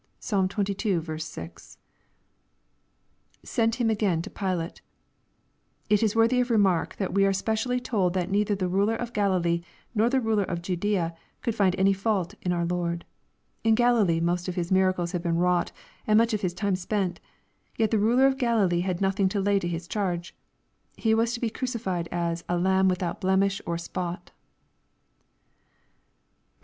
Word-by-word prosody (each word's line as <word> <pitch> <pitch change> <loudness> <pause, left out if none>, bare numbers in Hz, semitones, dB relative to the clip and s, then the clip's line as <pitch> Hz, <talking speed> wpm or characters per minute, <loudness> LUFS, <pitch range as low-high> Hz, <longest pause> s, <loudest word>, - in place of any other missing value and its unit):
(Psalm 195 -4 0
xxiL 195 -6 -1
6.) - - -9 1.7
[Sent 230 -2 0
him 240 -3 0
a^ain 200 -7 +1
to - - -8
Pilate,] 185 -4 -3 1.1
It 210 - +4
is 220 -2 +1
wortliy 230 +3 +4
of 250 - -2
remark 195 -7 +2
that 195 - -3
we 195 0 +3
are 195 - +4
specially 220 +5 0
told 200 -8 0
that 185 0 -1
neither 205 +1 +2
the 185 -2 -1
ruler 200 +5 +1
of 240 +1 -5
G 210 - 0
alilee, 175 -4 +1 0.3
nor 225 +1 +3
the 265 +1 +2
ruler 220 -3 +1
of 175 -3 -3
Ju 180 0 -1
daea, 175 -3 -1 0.3
could 230 - 0
find 195 -4 +2
any 195 +1 +4
fault 195 -3 -1
in 180 - -1
our 170 -1 0
Lord. 170 -1 -2 0.6
In 225 0 +4
Galilee 225 -8 +3
most 175 +2 0
of 180 - -3
His 175 -1 -3
miracles 185 -2 +2
had 180 -3 -2
been 170 -1 0
wrought, 175 0 +2 0.4
and 215 0 +5
much 230 +1 +3
of 210 - -1
His 180 -3 -2
time 200 0 0
spent. 185 0 -2 0.6
Yet 220 -2 +1
the 220 - +3
ruler 240 +6 +4
of 270 0 +3
Galilee 210 -9 +2
had 180 -1 -2
nothing 195 0 +2
to 200 - -1
lay 200 0 +2
to 175 - -3
His 170 0 -4
charge. 175 -4 -3 0.6
He 220 -1 +2
was 225 +1 +2
to 235 - -3
be 235 -2 -1
crucified 215 -10 -3
as 170 -1 -2
" - - -36
a 175 - +1
lamb 190 +1 +3
without 180 -1 -1
blemish 195 +1 +2
or 170 - -1
spot" 175 +1 -4
• - - -35
12. - - -21
195 Hz, 180 wpm, -26 LUFS, 175-220 Hz, 1.7 s, and